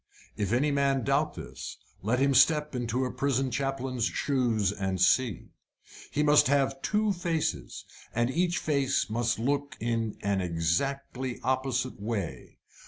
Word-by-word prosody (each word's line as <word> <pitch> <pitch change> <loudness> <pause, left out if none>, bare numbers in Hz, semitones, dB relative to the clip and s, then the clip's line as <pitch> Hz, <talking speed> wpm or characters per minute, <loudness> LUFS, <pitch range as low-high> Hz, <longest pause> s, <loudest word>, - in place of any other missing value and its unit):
If 100 -1 -2
any 140 +5 +2
man 140 -2 +1
doubt 140 +4 +1
this, - - -8 0.2
let 115 +6 +1
him 140 +1 +3
step 150 +3 +4
into 125 +1 -1
a 125 - -3
prison 135 -1 0
chaplain's 135 -2 -1
shoes 120 -8 +1
and 95 -2 -2
see. 100 +3 +2 0.6
He 150 - 0
must 150 -2 +5
have 135 -1 +1
two 210 -1 +1
faces, 165 - -2 0.3
and 120 +2 0
each 175 +3 +1
face 140 - 0
must 120 +1 0
look 140 +4 -1
in 115 -1 -1
an 100 -1 +1
exactly 120 +10 -1
opposite 130 -2 -1
way. 100 - -4
130 Hz, 140 wpm, -28 LUFS, 115-140 Hz, 0.6 s, must